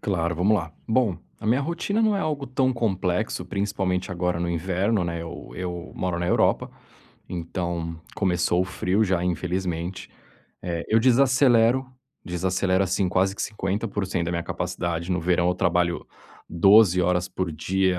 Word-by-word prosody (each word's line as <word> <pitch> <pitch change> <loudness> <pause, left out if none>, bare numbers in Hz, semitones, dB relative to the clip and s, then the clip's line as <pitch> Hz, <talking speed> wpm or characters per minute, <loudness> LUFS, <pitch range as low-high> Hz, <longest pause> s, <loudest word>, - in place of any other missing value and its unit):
Claro, 85 -4 -1
vamos 100 +5 +3
lá. 85 -3 -6
Bom, 110 -5 +1 0.2
a - - -6
minha 125 +5 +3
rotina 170 +8 -1
não 215 -2 +3
é 195 - -1
algo 145 -3 -2
tão 130 0 +1
complexo 100 -4 -1
principalmente 95 -1 -2
agora 90 -1 -1
no 85 - -1
inverno, 95 +4 0
né, 85 -1 -3
eu 85 0 -8
eu 90 -1 -5
moro 90 -2 -2
na 90 - -1
Europa, - - +2 0.6
então 85 -1 -4
começou 90 -2 +1
o - - +2
frio 95 +3 0
já, 90 -2 0
infelizmente. 90 0 -2 0.5
Eh, 85 -1 -3
eu 110 - +4
desacelero, 125 0 +4 0.4
desacelero 95 +2 0
assim 95 0 0
quase 95 +2 +1
que - - -2
50% 100 -3 -2
da - - -1
minha 85 -1 -1
capacidade. 85 +1 -3
No 90 - 0
verão, 90 +1 +2
eu 90 - +2
trabalho 85 -1 0 0.4
12 95 +1 +6
horas 90 0 +1
por 90 -3 -3
dia, 95 +3 0
90 Hz, 155 wpm, -25 LUFS, 85-105 Hz, 0.6 s, 12